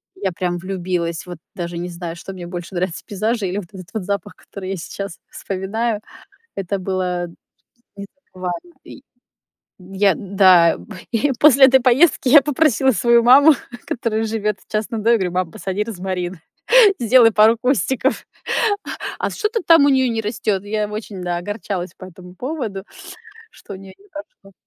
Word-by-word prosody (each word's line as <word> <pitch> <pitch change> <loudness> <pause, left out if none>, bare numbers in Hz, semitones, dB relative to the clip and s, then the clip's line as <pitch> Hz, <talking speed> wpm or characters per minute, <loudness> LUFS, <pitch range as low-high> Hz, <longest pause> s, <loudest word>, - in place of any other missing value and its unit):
Я 195 -2 -2
прям 175 0 -2
влюбилась. 175 -2 -3
Вот 175 -2 -8 0.2
даже 170 -1 -5
не 175 +1 -4
знаю, 170 -1 -6
что 195 +3 -9
мне 180 -2 -8
больше 175 +1 -7
нравится: 175 -1 -3
пейзажи 215 +1 -2
или 185 +2 -3
вот 175 -4 -10
этот 185 -2 -11
вот 220 -3 -3
запах, 200 +1 -4
который 190 -2 -9
я 195 - -3
сейчас 195 +2 -7
вспоминаю. 205 +3 -3 0.5
Это 195 0 -3
было 180 -2 -2 0.7
не 200 0 -7
так 280 +7 -47
важно 185 - -5
И, 275 - -12 0.8
я, 195 +1 +1
да, 185 -4 +4
п - - -14 0.3
и 245 +5 +1
п 275 +5 +5
осле 275 -2 +7
этой 265 0 +4
поездки 260 +2 +3
я 290 +2 +8
попросила 265 -2 +2
свою 235 0 +3
маму, 280 +5 +7 0.3
которая 225 -3 -2
живёт 215 -2 -2
в - - -26
частном 215 +1 -2
доме. 230 +2 +4
Я - - +4
говорю: 180 -2 -1
"Мам, 180 -2 -1
посади 195 +1 -3
розмарин, 185 -4 -5 0.6
сделай 235 -1 +5
пару 220 +2 +5
кустиков". 265 0 0 0.9
А - - -2
что-то 440 +2 -2
там 330 -4 +7
у - - +4
неё 260 -1 +3
не 225 - -1
растёт. 210 -2 -2
Я 210 +1 -2
очень, 210 -3 -7
да, 175 -1 -2
огорчалась 185 -2 -5
по 185 - -10
этому 180 0 -14
поводу, 245 -5 -5 0.7
что 200 - -11
у - - -7
неё 190 0 -12
не 405 - -23
пошло. 300 - -12
200 Hz, 175 wpm, -20 LUFS, 185-235 Hz, 0.9 s, я